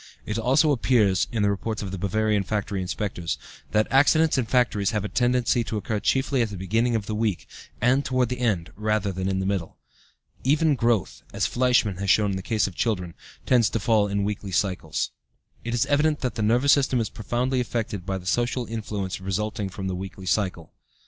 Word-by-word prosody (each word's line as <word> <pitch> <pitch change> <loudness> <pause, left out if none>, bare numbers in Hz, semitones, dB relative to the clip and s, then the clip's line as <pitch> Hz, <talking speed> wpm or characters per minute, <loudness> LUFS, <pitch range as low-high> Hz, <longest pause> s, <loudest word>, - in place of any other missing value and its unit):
It 105 +1 -2
also 135 +6 +3
appears 110 -7 +2
(in 110 -3 0
the 100 - +3
reports 110 +2 -3
of 95 - -5
the 95 - -5
Bavarian 105 +2 +1
factory 100 -1 -2
inspectors) 90 -2 -3 0.3
that 105 0 +2
accidents 155 +4 +4
in 130 -3 +1
factories 115 -5 +2
have 105 -2 -1
a - - -1
tendency 125 0 +1
to 110 - -3
occur 105 0 -2
chiefly 135 +3 +1
at 115 - 0
the 100 - -7
beginning 115 +6 +1
of 110 -3 -1
the 110 - -4
week, 105 -4 -1 0.3
and 130 +4 +3
toward 130 -3 +1
the 125 0 -3
end 105 -9 0
rather 105 -1 0
than 95 +1 -2
in 95 - 0
the 95 - -2
middle. 95 -4 -2 0.7
Even 150 +3 +3
growth, 115 -6 0
as - - 0
Fleischmann 120 -6 +2
has 100 +1 -3
shown 105 0 +4
in - - -2
the - - -4
case 110 +2 0
of 100 - -4
children, 90 -4 -1 0.3
tends 120 -5 +4
to 115 - -1
fall 105 -1 +2
into 100 0 -1
weekly 100 -1 -3
cycles. 90 -4 -1 0.5
It 120 0 -2
is 120 - +2
evident 145 +2 +2
that 125 -3 -1
the - - -4
nervous 120 +6 +3
system 135 -3 +3
is 110 -2 -1
profoundly 125 +4 -1
affected 110 -5 -3
by 95 +1 -2
the 90 - -10
social 120 +5 0
influences 105 -4 -4
resulting 100 +1 -2
from 95 +1 -7
the 95 - -2
weekly 95 +1 -7
cycle. 90 -3 -1
110 Hz, 205 wpm, -25 LUFS, 95-120 Hz, 0.7 s, accidents